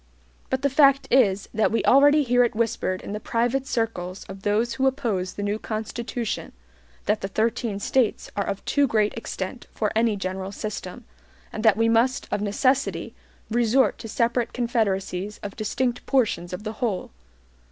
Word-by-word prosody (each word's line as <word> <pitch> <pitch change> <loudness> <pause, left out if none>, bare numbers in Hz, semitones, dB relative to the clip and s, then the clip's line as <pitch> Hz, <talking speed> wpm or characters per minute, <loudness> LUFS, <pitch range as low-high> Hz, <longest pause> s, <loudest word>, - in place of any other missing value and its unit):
But 260 +1 -1
the 280 - +3
fact 275 -1 +5
is, 205 -7 +3
that 220 -1 +2
we 230 - 0
already 290 +3 +6
hear 245 -1 +4
it 240 -1 0
whispered 215 -4 -1
in - - -6
the 210 - -3
private 240 +4 0
circles 195 -5 -2
of 195 0 -9
those 215 +4 +1
who 265 0 +1
oppose 220 -9 -1
the 205 - -5
new 205 +1 -1
Constitution, 225 +1 -4 0.5
that 210 +1 +1
the 195 - -2
thirteen 220 0 -1
States 240 +2 0
are 200 - -1
of 200 0 -4
too 285 -1 +3
great 215 -3 +1
extent 230 0 -6
for 210 -2 -1
any 225 -1 +3
general 190 0 -4
system, 210 +2 -6 0.5
and 215 - -4
that 220 -3 +5
we 225 0 +3
must 235 +4 +2
of 205 - 0
necessity 255 +7 0 0.4
resort 240 +3 +3
to 225 - -7
separate 235 +1 0
confederacies 205 -5 -1
of 200 -1 -6
distinct 240 +3 -1
portions 215 -10 +1
of 180 +3 -6
the 215 0 -4
whole. 215 -7 -1
225 Hz, 170 wpm, -24 LUFS, 205-245 Hz, 0.5 s, already